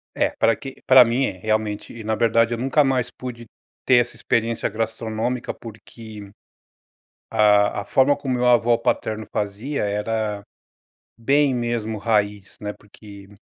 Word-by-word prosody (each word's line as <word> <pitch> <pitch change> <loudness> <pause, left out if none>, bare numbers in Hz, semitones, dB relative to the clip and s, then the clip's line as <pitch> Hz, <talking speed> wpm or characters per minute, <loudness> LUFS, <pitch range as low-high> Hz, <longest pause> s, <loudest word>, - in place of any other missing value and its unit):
É - - +2
pra 115 - +3
que 135 -2 -10
pra 130 -1 +8
mim 120 +4 +1
é, - - -2
realmente 110 +2 -3
na 110 +1 -1
verdade 115 +1 +2
eu - - -2
nunca 135 +4 +2
mais 130 -3 0
pude 125 -2 -8 0.4
ter 130 - +5
essa 120 0 -6
experiência 115 0 -1
gastronômica, 115 +2 -3
porque 110 -1 -11 1.0
a 105 -1 +3
a - - -12
forma 135 +6 +3
como 135 -3 -3
meu 125 0 0
avô 120 -1 +4
paterno 110 -1 -2
fazia 105 +7 -3
era 105 0 -2 0.8
bem 140 +3 +2
mesmo 120 -2 -2
raiz, 105 -2 -1
né, 105 0 -4
porque 100 -1 -14
115 Hz, 145 wpm, -22 LUFS, 105-125 Hz, 1.0 s, pra